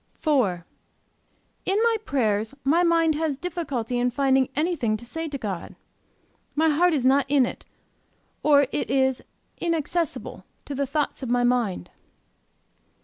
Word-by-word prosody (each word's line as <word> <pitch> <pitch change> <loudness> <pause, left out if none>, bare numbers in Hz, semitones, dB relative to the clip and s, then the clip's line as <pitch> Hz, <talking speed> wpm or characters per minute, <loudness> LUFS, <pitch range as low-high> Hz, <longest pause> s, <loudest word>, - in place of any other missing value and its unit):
"IV. 225 - +2 1.0
In 385 +2 +1
my 465 -1 +3
prayers 220 - 0
my 315 +6 +3
mind 330 -2 +3
has 305 -2 -1
difficulty 280 -8 -3
in 245 +1 +2
finding 265 0 +2
anything 295 -9 0
to 240 - -11
say 325 +7 -4
to 285 -2 -4
God. 200 -8 -5 0.8
My 320 +2 +3
heart 335 +3 +3
is 260 -4 -1
not 275 +1 +4
in 275 -2 +4
it, - - -7 0.8
or 285 -2 +5
it - - -2
is 265 -1 +2 0.4
inaccessible 335 0 -2 0.2
to 285 - -5
the 280 0 -1
thoughts 295 +2 -2
of 255 - -4
my 245 0 +2
mind. 240 - 0
275 Hz, 145 wpm, -25 LUFS, 245-320 Hz, 1.0 s, or